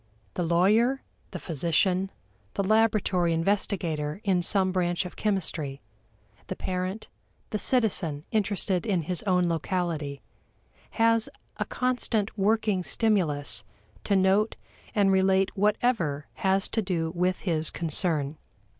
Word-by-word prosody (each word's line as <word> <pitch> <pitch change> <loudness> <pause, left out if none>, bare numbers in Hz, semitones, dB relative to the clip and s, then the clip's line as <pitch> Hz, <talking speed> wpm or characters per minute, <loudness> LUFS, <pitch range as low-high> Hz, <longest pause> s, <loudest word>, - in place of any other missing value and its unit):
The - - -2
lawyer, 210 +10 +3 0.3
the - - -6
physician, 180 +4 +1 0.5
the 200 - 0
laboratory 205 -5 +2
investigator 165 -3 -1
in 190 -3 +2
some 190 +1 +2
branch 175 -1 0
of 180 - -8
chemistry, 160 -9 -1 0.7
the 185 - -4
parent, 185 +4 -3 0.4
the 210 - -1
citizen 180 - +1
interested 200 -3 0
in 185 -6 +1
his 175 +2 -1
own 180 -2 +3
locality, 165 -4 -2 0.7
has 230 0 +3 0.3
a - - -1
constant 245 -4 -1
working 210 -1 +1
stimulus 155 - +1 0.4
to 200 - +2
note 195 +3 +3 0.4
and 200 -2 +4
relate 190 0 +3
whatever 205 - +1
has 190 0 +1
to 225 - 0
do 170 -5 -2
with 180 +1 0
his 160 -4 0
concern. 155 -3 0
185 Hz, 120 wpm, -27 LUFS, 170-210 Hz, 0.7 s, and